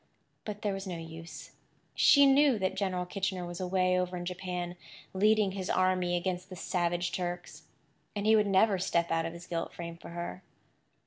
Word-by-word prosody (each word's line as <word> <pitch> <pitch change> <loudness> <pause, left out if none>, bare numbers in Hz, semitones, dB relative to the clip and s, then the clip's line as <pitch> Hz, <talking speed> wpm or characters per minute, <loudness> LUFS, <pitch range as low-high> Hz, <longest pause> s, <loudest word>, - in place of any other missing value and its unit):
But 210 -1 -6
there 205 -2 0
was 195 0 -5
no 180 -2 -4
use. 165 0 -9 0.4
She 285 -1 +6
knew 275 -2 +5
that 190 -2 0
General 190 -2 -1
Kitchener 190 -1 -2
was 175 0 -6
away 185 0 +2
over 180 0 -2
in 175 - -5
Japan, 180 -1 -4 0.4
leading 210 +1 +3
his 190 -1 -4
army 185 -1 +2
against 180 0 -3
the 185 - -8
savage 175 0 -1
Turks; 175 -3 -5 0.5
and 205 0 -2
he 220 +1 +6
would 210 -1 +3
never 195 0 +4
step 170 -2 0
out 165 0 +1
of 165 - -6
his 170 +1 -10
gilt 170 -2 -3
frame 170 -1 -7
for - - -11
her. 175 +2 -6
180 Hz, 185 wpm, -30 LUFS, 175-195 Hz, 0.5 s, She